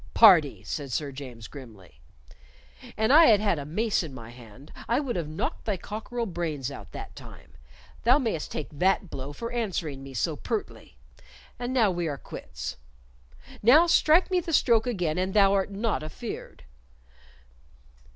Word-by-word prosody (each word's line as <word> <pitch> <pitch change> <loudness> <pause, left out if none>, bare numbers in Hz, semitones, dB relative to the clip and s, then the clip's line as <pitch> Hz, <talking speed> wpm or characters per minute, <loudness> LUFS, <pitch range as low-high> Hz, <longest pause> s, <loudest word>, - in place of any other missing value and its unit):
"Pardee!" 155 - +6
said 140 +7 -5
Sir 145 +3 -2
James, 125 -5 -9
grimly. 110 - -13 1.0
"An 220 +3 +2
I 320 +3 +8
had 215 -6 +6
had 200 -6 +1
a 140 - -6
mace 210 +8 0
in 155 -6 -7
my 115 -2 -10
hand, 120 +3 -14
I 235 +3 +2
would 270 -5 -3
have 170 -4 -2
knocked 155 +1 -4
thy 210 -3 -1
cockerel 225 +5 -5
brains 160 - -3
out - - -10
that - - -8
time. - - -13 0.5
Thou 245 +4 +5
mayst 225 - -2
take 150 - -4
that 185 +4 +1
blow 135 +1 -6
for 230 +11 -6
answering 175 - -3
me 135 -1 -10
so 110 - 0
pertly. - - -5 0.6
And 245 +1 -3
now 230 -6 +3
we 175 -2 -2
are 145 -2 -3
quits. - - -7 0.8
Now 280 +10 +7
strike 340 +2 +4
me 365 - +3
the 335 -1 -5
stroke 235 -5 +3
again 180 -8 -1
an 190 +1 -1
thou 200 -2 +5
art 195 -1 +1
not 205 0 -1
afeard." 155 +10 -8
180 Hz, 165 wpm, -27 LUFS, 140-230 Hz, 1.0 s, I